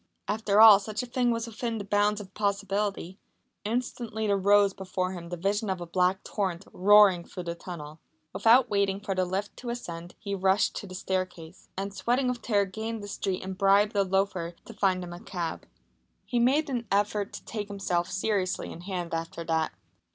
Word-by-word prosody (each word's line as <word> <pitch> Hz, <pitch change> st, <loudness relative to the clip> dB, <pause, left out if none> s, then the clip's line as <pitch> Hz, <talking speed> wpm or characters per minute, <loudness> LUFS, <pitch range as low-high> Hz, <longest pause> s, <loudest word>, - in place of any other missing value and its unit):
After 210 Hz, -1 st, +1 dB
all 215 Hz, -3 st, +10 dB
such 210 Hz, +3 st, -4 dB
a -, -, -4 dB
thing 245 Hz, 0 st, 0 dB
was 230 Hz, -1 st, 0 dB
within 230 Hz, 0 st, -4 dB
the 205 Hz, -, -4 dB
bounds 205 Hz, +1 st, +2 dB
of 195 Hz, -2 st, -10 dB
possibility. 200 Hz, -2 st, -2 dB, 0.4 s
Instantly 225 Hz, -1 st, -2 dB
there 200 Hz, -1 st, +2 dB
rose 200 Hz, 0 st, +4 dB
before 185 Hz, -1 st, -3 dB
him 170 Hz, -2 st, -7 dB
the 175 Hz, -, -4 dB
vision 200 Hz, +4 st, -1 dB
of 190 Hz, -1 st, -1 dB
a 175 Hz, -, -5 dB
black 180 Hz, +2 st, +1 dB
torrent 190 Hz, -3 st, -3 dB
roaring 200 Hz, -2 st, +6 dB
through 180 Hz, -, -8 dB
the 170 Hz, -1 st, -3 dB
tunnel. 165 Hz, -3 st, -9 dB, 0.3 s
Without 240 Hz, +3 st, +5 dB
waiting 200 Hz, -2 st, +1 dB
for 200 Hz, -1 st, -3 dB
the 185 Hz, -1 st, +1 dB
lift 195 Hz, +3 st, -3 dB
to 245 Hz, -, -6 dB
ascend 175 Hz, -7 st, -6 dB
he 200 Hz, -2 st, -5 dB
rushed 190 Hz, +1 st, +2 dB
to 205 Hz, -, -6 dB
the 185 Hz, -, -9 dB
staircase, 185 Hz, -2 st, -4 dB
and 195 Hz, +1 st, -3 dB
sweating 240 Hz, +7 st, 0 dB
with 250 Hz, -1 st, -3 dB
terror 205 Hz, -3 st, +2 dB
gained 220 Hz, +3 st, -5 dB
the -, -, -6 dB
street 195 Hz, -2 st, -3 dB
and 190 Hz, 0 st, -6 dB
bribed 200 Hz, +2 st, +4 dB
a 200 Hz, -, +4 dB
loafer 190 Hz, -3 st, 0 dB
to 230 Hz, -, -10 dB
find 190 Hz, -3 st, +1 dB
him 175 Hz, -1 st, -7 dB
a 175 Hz, -, -8 dB
cab. 175 Hz, -3 st, -5 dB, 0.6 s
He 240 Hz, -, 0 dB
made 275 Hz, +6 st, +3 dB
an 245 Hz, -4 st, -3 dB
effort 205 Hz, 0 st, +1 dB
to -, -, -9 dB
take 210 Hz, -2 st, -4 dB
himself 185 Hz, -3 st, -1 dB
seriously 190 Hz, 0 st, -1 dB
in 170 Hz, -, -9 dB
hand 180 Hz, -2 st, -4 dB
after 165 Hz, 0 st, -4 dB
that. 160 Hz, -1 st, 0 dB
200 Hz, 195 wpm, -28 LUFS, 185-210 Hz, 0.6 s, all